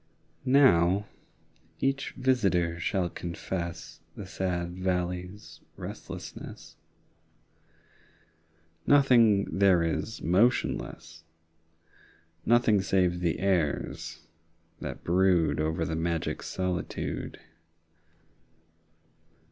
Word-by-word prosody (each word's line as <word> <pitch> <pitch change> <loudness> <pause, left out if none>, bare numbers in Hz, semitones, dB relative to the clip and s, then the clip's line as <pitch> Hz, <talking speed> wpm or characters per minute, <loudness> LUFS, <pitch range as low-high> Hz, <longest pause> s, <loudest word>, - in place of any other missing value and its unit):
Now 105 -8 +4 0.7
each 135 +1 -1
visitor 95 -10 +1
shall 90 +1 0
confess 85 -1 -5 0.2
The 100 - -7
sad 90 -2 -2
valley's 90 +1 -3 0.2
restlessness. - - -8 2.1
10 145 - +7
Nothing 115 -9 +4
there 95 -4 +5
is 85 +7 -2
motionless, 85 -4 0 1.2
Nothing 115 -4 +4
save 90 -2 +1
the 85 -2 0
airs 85 -3 -1 0.5
that - - -6
brood 90 -2 +2
Over 80 +1 0
the 80 - -2
magic 85 0 -2
solitude. 90 -1 -4
90 Hz, 75 wpm, -28 LUFS, 85-100 Hz, 2.1 s, 10